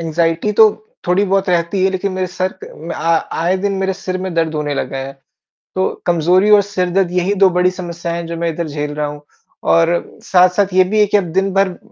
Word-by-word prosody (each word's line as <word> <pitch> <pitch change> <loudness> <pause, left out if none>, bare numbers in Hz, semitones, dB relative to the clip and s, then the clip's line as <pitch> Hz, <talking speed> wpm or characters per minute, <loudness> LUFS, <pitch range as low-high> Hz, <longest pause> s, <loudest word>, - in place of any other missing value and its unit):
Anxiety 165 +4 0
तो 215 0 +6 0.4
थोड़ी 180 +3 +2
बहुत 195 0 0
रहती 175 +2 0
है 190 - +3
लेकिन 190 +1 -2
मेरे 185 0 -2
सर 185 +1 -3
क - - -5
अ, - - -12
म 165 +3 -7
आ 165 0 +1 0.3
आए 180 +3 +1
दिन 200 +1 -1
मेरे 190 0 0
सिर 185 -1 -5
में 185 0 -4
दर्द 165 -1 0
होने 150 -1 -2
लगा 135 - -3
है। 135 +1 -5 0.6
तो, 190 - -1
कमज़ोरी 175 +4 +3
और 210 - +7
सिरदर्द 185 -2 -1
यही 180 +2 0
2 190 - +7
बड़ी 180 0 +2
समस्याएँ 170 -2 -5
हैं 170 - -5
जो 170 0 -5
मैं 170 0 -1
इधर 165 +1 -3
झेल 150 0 -4
रहा 150 0 -2
हूँ, 145 0 -8 0.4
और 165 +1 +1
साथ-साथ 185 +1 +3
ये 185 0 +5
भी 210 +4 -1
है 210 - +6
कि 205 - +3
अब 200 - +1
दिन 195 +1 +1
भर 195 -2 +1
180 Hz, 230 wpm, -17 LUFS, 165-190 Hz, 0.6 s, और